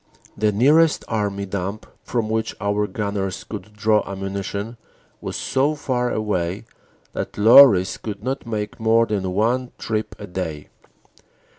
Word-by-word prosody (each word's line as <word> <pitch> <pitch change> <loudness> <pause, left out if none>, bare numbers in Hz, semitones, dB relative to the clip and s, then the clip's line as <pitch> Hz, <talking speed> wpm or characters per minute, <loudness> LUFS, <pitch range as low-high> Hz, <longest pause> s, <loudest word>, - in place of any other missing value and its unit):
The 105 0 +1
nearest 150 +9 +4
Army 100 -3 -2
dump 100 +2 -4 0.2
from 115 -3 -2
which 110 0 -2
our 105 0 0
gunners 100 -4 -3
could 110 - -8
draw 105 0 +2
ammunition 100 +3 -4 0.4
was - - -5
so 140 +3 0
far 125 -4 -1
away 100 -2 -2 0.5
that - - -5
lorries 105 -3 +7
could 105 -2 -7
not 130 0 -3
make 105 -2 -4
more 115 +1 +4
than 100 -4 -2
one 120 +5 0
trip 110 -1 -3
a 105 - -8
day. 90 -5 -5
105 Hz, 135 wpm, -22 LUFS, 100-115 Hz, 0.5 s, lorries